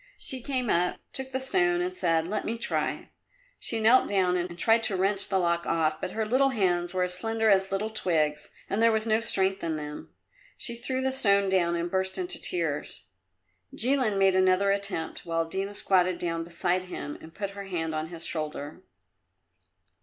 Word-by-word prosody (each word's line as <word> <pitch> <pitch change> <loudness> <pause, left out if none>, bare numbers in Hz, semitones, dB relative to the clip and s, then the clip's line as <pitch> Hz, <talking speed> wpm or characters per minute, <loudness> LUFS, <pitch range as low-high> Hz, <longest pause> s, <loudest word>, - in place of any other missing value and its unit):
She 260 -1 -3
came 255 -1 -2
up, 180 -2 +1 0.2
took 265 0 +2
the 260 - -1
stone 350 +6 +2
and 360 +1 -2
said, 165 - +1
"Let 210 +3 -2
me 230 - -3
try." 230 - -2 0.5
She 230 - -2
knelt 230 +4 +5
down 185 -3 +2
and 175 -1 -3
tried 225 +4 +4
to 210 -3 0
wrench 195 +1 +1
the 190 - +2
lock 170 -1 0
off, 155 -1 0
but 185 - -4
her 220 0 -1
little 260 +5 +3
hands 175 -7 0
were 185 0 0
as 180 0 +2
slender 225 +3 +1
as 190 -1 +2
little 210 +3 -2
twigs 155 -7 0 0.2
and 205 - -1
there 230 0 +5
was 220 0 0
no 220 0 +2
strength 195 -4 0
in 165 -1 -1
them. 150 -1 -7 0.5
She 235 - -3
threw 260 +2 -3
the 265 - +1
stone 200 -6 +3
down 175 -2 +2
and 170 0 -3
burst 190 0 -1
into 365 0 0
tears. 160 - -2 0.7
Jilin 250 -4 +2
made 195 -1 +4
another 185 +1 +3
attempt, 200 -5 -2
while 165 -1 -1
Dina 195 +4 -4
squatted 185 -3 +2
down 165 -1 -2
beside 175 +2 -1
him 145 -5 -6
and 160 - -12
put 200 -1 -4
her 200 0 -8
hand 165 -4 -3
on 155 0 -3
his 170 0 -9
shoulder. 155 0 -5
190 Hz, 190 wpm, -27 LUFS, 170-225 Hz, 0.7 s, knelt